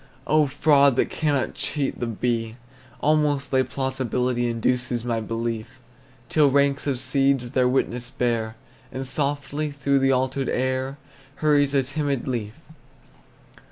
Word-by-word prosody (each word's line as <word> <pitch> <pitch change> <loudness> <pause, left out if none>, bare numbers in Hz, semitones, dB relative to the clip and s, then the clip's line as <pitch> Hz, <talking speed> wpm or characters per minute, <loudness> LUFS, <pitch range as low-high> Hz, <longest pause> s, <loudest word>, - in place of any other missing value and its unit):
Oh, 155 -1 +3
fraud 140 -1 +4
that - - +1
cannot 145 -4 0
cheat 140 -3 -2
the 120 - -2
bee, 115 0 -2 0.4
Almost 150 -2 +1
thy 130 -1 +4
plausibility 130 -2 -1
Induces 120 +1 -1
my 115 -2 0
belief, 115 0 -4 0.5
Till 150 -2 +4
ranks 140 +1 +2
of 135 -3 0
seeds 135 -1 +1
their 125 -1 +3
witness 125 -1 -1
bear, 115 -4 -1 0.4
And 130 0 -4
softly 145 +2 -2
through 140 -1 +1
the 135 0 +3
altered 130 +1 0
air 130 +1 -1 0.4
Hurries 145 -2 +2
a 135 - +4
timid 140 -1 -2
leaf! 115 -4 -3
130 Hz, 130 wpm, -24 LUFS, 120-140 Hz, 0.5 s, fraud